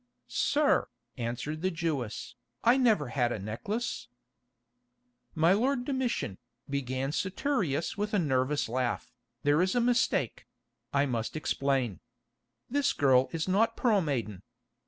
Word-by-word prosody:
"Sir," 300 +1 +2 0.3
answered 125 +6 -4
the 185 - +1
Jewess, 160 - -3 0.3
"I 235 +2 +6
never 220 - +3
had 120 -2 +1
a - - -1
necklace——" 125 - -4 1.3
"My 165 +3 +5
lord 245 +4 +1
Domitian," 255 - -1 0.3
began 135 -1 -2
Saturius 190 - -1
with 210 +1 -1
a - - +4
nervous 145 -3 +1
laugh, 125 +1 -2 0.3
"there 145 +3 +4
is 185 +3 +1
a - - +4
mistake—I 125 - -1
must 115 -2 -2
explain. 135 - 0 0.7
This 285 +3 +1
girl 130 -2 +4
is 165 0 -2
not 225 +5 +2
Pearl 220 -5 +3
Maiden. 115 - -2
150 Hz, 120 wpm, -30 LUFS, -, 1.3 s, I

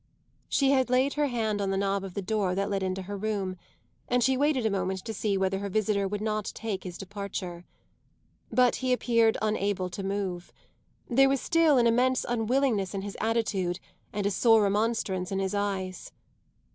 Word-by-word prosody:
She 275 -1 +3
had 260 -2 +2
laid 255 +3 +2
her 295 -1 +1
hand 220 -5 -1
on 195 - 0
the 195 - 0
knob 195 0 0
of 190 -2 -8
the 200 - -3
door 195 -2 0
that 200 +1 -1
led 195 -1 0
into 190 0 -2
her 200 +2 -6
room, 200 -2 -2 0.5
and 245 0 +2
she 265 +3 +3
waited 275 -3 +1
a 220 - +2
moment 190 -1 -2
to 225 - -4
see 205 -1 0
whether 190 0 0
her 200 0 -4
visitor 200 -1 +1
would 205 +1 -3
not 215 -1 -1
take 210 -4 -4
his 180 -2 -7
departure. 195 -3 -6 0.9
But 250 -1 +3
he 255 -1 +1
appeared 230 -2 +3
unable 200 -3 0
to 185 - -5
move; 190 -3 -3 0.6
there 270 +3 +4
was 275 0 +1
still 330 -2 +3
an 240 - +4
immense 250 +2 +3
unwillingness 230 -4 +1
in 195 - -3
his 200 -1 -6
attitude 205 -5 0 0.3
and 205 -1 -3
a 200 - +2
sore 225 +2 +5
remonstrance 200 -3 0
in 195 - -1
his 195 0 -1
eyes. 195 -3 -3
205 Hz, 190 wpm, -28 LUFS, 195-235 Hz, 0.9 s, sore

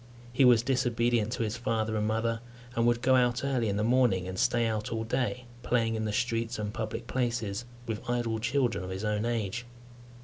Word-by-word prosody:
He 130 +1 +5
was 120 -3 +6
disobedient 120 -3 +1
to 120 - -1
his 110 +1 -2
father 110 -2 -1
and 105 0 0
mother, 115 +1 0 0.4
and 115 0 +2
would 120 0 +2
go 130 0 +5
out 125 0 +2
early 125 -5 +1
in 100 - -1
the 105 - +1
morning 115 -6 +3
and 95 0 -4
stay 120 -1 +2
out 110 -2 -2
all 115 -1 -1
day, 125 +1 -1 0.2
playing 115 -2 +1
in 110 -1 -2
the 105 - -1
streets 115 +1 -1
and 105 -1 -3
public 110 -2 -4
places 120 -4 -2 0.2
with 115 0 -5
idle 120 -2 0
children 120 -2 0
of 90 - -6
his 95 +3 -4
own 105 +1 0
age. 115 -1 -2
115 Hz, 205 wpm, -29 LUFS, 110-120 Hz, 0.4 s, was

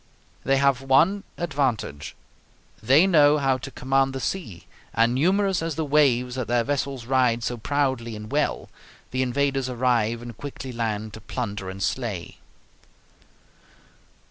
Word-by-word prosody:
They 135 +1 +2
have 140 -2 +2
one 160 +10 +3
advantage: 135 - -2 0.7
they 135 - +5
know 150 -5 +5
how 135 -2 +1
to 135 - -7
command 135 0 0
the 135 - -4
sea, 125 - -4 0.3
and 115 +2 +3
numerous 190 +7 +2
as 165 -2 -3
the 160 - -2
waves 135 -4 +3
that 125 -2 -3
their 120 0 +2
vessels 135 -2 -2
ride 125 -2 +2
so 120 - -2
proudly 130 -2 -1
and 105 +2 -9
well, 150 +1 0 0.4
the 130 - -1
invaders 135 +1 0
arrive 120 -2 0
and 120 -2 -8
quickly 135 0 -7
land 110 -2 -3
to 110 - -9
plunder 105 -5 -4
and 95 +1 -5
slay. 110 -9 -3
130 Hz, 145 wpm, -24 LUFS, 115-140 Hz, 0.7 s, they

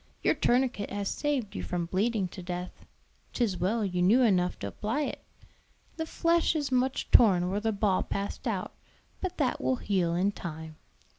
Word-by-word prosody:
Your - - +4
tourniquet 245 -4 +1
has 200 0 -3
saved 280 -8 -2
you - - -3
from 175 -1 -2
bleeding 200 +3 0
to 185 - -9
death. 180 0 -6 0.5
'Tis 215 -7 0
well 210 +4 +1
you 180 -2 -1
knew 220 +8 +5
enough 180 -5 +2
to 100 - -5
apply 215 - -2
it. - - -5 0.7
The 320 -1 -3
flesh 335 0 +2
is 290 -3 -1
much 255 +1 0
torn 185 -6 +5
where 200 - 0
the 220 +1 0
ball 200 -2 +1
passed 200 0 -4
out; - - -2 0.5
but 375 -2 -4
that 270 -5 0
will 260 - +1
heal 185 -7 0
in 190 +3 +2
time." 160 -4 -8
205 Hz, 175 wpm, -29 LUFS, 180-250 Hz, 0.7 s, knew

